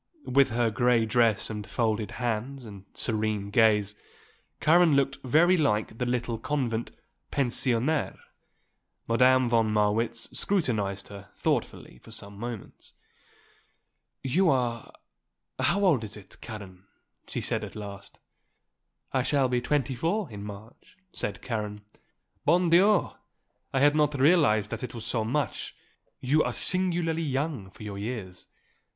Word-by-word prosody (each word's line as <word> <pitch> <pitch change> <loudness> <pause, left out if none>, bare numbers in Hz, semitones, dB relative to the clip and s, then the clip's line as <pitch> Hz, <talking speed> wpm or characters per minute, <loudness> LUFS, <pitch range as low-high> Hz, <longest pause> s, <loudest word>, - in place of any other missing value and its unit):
With 135 +1 +4
her 115 0 +1
grey 120 +1 +3
dress 110 -2 +2
and 105 -1 -6
folded 110 -3 -1
hands 125 +2 -3
and 100 -3 -11
serene 105 -3 -1
gaze 105 -2 +3 0.7
Karen 165 -1 +5
looked 140 0 +1
very 160 +8 +4
like 110 - 0
the 125 - -1
little 120 -2 -1
convent 120 -6 -2 0.4
pensionnaire. 130 +2 0 0.9
Madame 130 +2 +4
von 115 -2 +2
Marwitz 110 +2 0
scrutinized 105 - 0
her 100 0 -11
thoughtfully - - -2
for - - -16
some 100 0 -8
moments. 115 0 -8 1.3
"You 170 +8 +3
are 120 -4 0 0.7
how 200 0 +2
old 145 -11 +3
is 105 0 -7
it, 95 -3 -15
Karen?" 100 -4 -9 0.4
she - - -4
said - - -2
at - - -8
last. 100 -1 -9 1.0
"I 130 - +2
shall 135 0 +2
be 125 -1 +1
twenty 135 -1 0
four 165 - -1
in 100 -1 -7
March," 105 - -11
said 100 - -4
Karen. 105 -4 -3 0.7
"Bon 170 +3 +3
Dieu! 195 +3 +5 0.6
I 135 - +1
had 145 +2 +5
not 150 -2 +2
realised 135 - +4
that 110 - -4
it 125 - -6
was 115 -2 -6
so 115 -1 -1
much; 135 +6 -2 0.4
you 145 +5 +2
are - - -1
singularly 175 -3 0
young 140 -8 -2
for 95 - -13
your 100 -2 -6
years." 100 -5 -6
120 Hz, 135 wpm, -27 LUFS, 105-145 Hz, 1.3 s, Karen